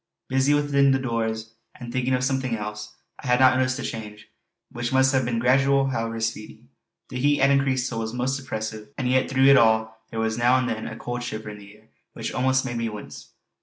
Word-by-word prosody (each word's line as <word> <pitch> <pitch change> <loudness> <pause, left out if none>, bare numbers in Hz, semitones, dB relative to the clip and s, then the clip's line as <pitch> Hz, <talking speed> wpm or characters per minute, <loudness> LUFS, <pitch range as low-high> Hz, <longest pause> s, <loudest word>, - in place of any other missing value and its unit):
Busy 135 +2 +3
within 140 -2 +3
doors 115 -3 -3 0.3
and 120 -1 -8
thinking 130 0 +1
of 125 - -1
something 130 -2 0
else, 105 0 -7 0.3
I - - -6
had 125 0 +3
not 130 0 +6
noticed 130 0 +1
the 135 - -5
change, 105 -2 -7 0.4
which 120 0 -4
must 130 +1 +3
have 130 -2 +2
been 120 -1 -1
gradual 135 +3 +3
however 115 -2 -3
speedy. 110 -1 -5 0.4
The 125 - -5
heat 145 +3 +3
had 140 +1 +4
increased 135 -2 +1
till 115 - -4
it 115 - -2
was 110 - -6
most 130 +2 -1
oppressive; 110 -4 -6
and 130 - -1
yet 130 +1 +2
through 130 0 +3
it 140 0 +8
all 110 -1 +2
there 115 - -5
was 110 +1 -1
now 120 +2 +4
and 130 -1 0
then 110 -1 -3
a 110 - -7
cold 120 0 -5
shiver 110 -3 -5
in 105 - -10
the 100 +1 -14
air 110 - -27 0.2
which - - -5
almost 130 +1 +1
made 120 -2 -3
me 115 -1 -1
wince. 105 -1 -10
125 Hz, 225 wpm, -24 LUFS, 110-130 Hz, 0.4 s, it